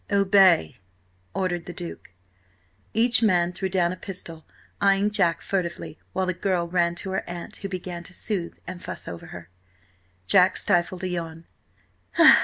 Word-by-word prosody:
"Obey," 195 - +4 0.6
ordered 175 -3 -1
the 175 - -6
Duke. 175 -3 -8 0.8
Each 230 +2 +4
man 180 -5 +3
threw 190 +1 -2
down 175 -2 +2
a - - -4
pistol, 170 -5 -6 0.4
eyeing 200 +1 +3
Jack 175 -5 +2
furtively, 180 -2 -3
while 190 - 0
the 185 - 0
girl 180 -1 0
ran 170 -1 +1
to 190 +2 -5
her 190 - -3
aunt, 175 -1 -7
who 195 - -5
began 180 -2 -5
to - - -10
soothe 185 -6 -3
and 185 -1 -7
fuss - - -7
over 85 - -7
her. 90 -1 -10 0.7
Jack 180 - +5
stifled 180 -1 +1
a - - 0
yawn. 165 -2 -5
180 Hz, 155 wpm, -25 LUFS, 170-195 Hz, 0.8 s, Jack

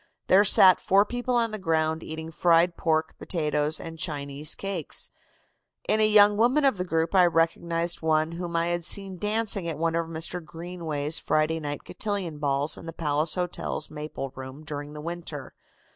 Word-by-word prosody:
There 195 +2 +7
sat 190 -2 +6
four 195 +2 +4
people 245 +2 -2
on 230 -2 +1
the 215 - -5
ground 160 -2 0
eating 160 +1 -7
fried 170 +1 +3
pork, 160 -1 0
potatoes 150 -2 -1
and 165 -1 -8
Chinese 145 -1 -3
cakes. 195 -6 -2 0.8
In 215 - +2
a 215 - +5
young 205 -1 +6
woman 255 +6 +3
of 265 -7 +3
the - - 0
group 165 -1 -1
I 185 -2 +6
recognized 170 +1 +1
one 155 0 +1
whom 170 0 -5
I 165 0 +2
had 175 0 -2
seen 190 +1 -1
dancing 210 -3 0
at 160 -3 -3
one 165 +1 0
of 165 0 -1
Mr. 165 +2 -1
Greenway's 160 -3 -1
Friday 155 +2 0
Night 145 -2 -5
Cotillion 195 -8 -4
balls 145 +1 0
in 165 - -11
the 165 - -6
Palace 155 0 -1
Hotel's 180 -1 -3
maple 150 -3 -6
room 130 +3 -9
during 145 -1 -6
the 150 - -8
winter. 165 -3 -6
165 Hz, 175 wpm, -26 LUFS, 155-185 Hz, 0.8 s, There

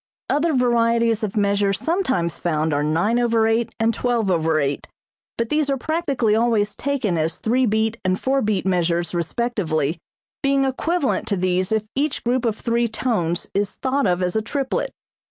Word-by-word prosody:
Other 315 +3 +2
varieties 235 -2 +2
of 215 -1 -3
measure 200 -1 +2
sometimes 260 - -1
found 155 -2 0
are 145 +1 +1
9/8 225 +7 +2
and 225 0 +2
12/8, 165 - 0 0.5
but 230 -1 -1
these 300 -1 +1
are 275 - +1
practically 275 -7 0
always 220 -3 +1
taken 245 - -1
as 160 +1 0
three 250 +3 +1
beat 220 +2 0
and 185 0 0
four 270 +1 +1
beat 210 -5 0
measures 175 -2 0
respectively, 170 - -1 0.4
being 275 0 +2
equivalent 285 +3 -1
to 200 - 0
these 185 +2 0
if 220 -1 +1
each 285 +2 -1
group 245 +1 0
of 220 -2 0
three 235 0 0
tones 210 -7 -1
is 200 +1 -1
thought 270 -2 0
of 180 0 +1
as 180 +2 -1
a 220 - +2
triplet. 275 +4 -2
220 Hz, 155 wpm, -22 LUFS, 180-250 Hz, 0.5 s, Other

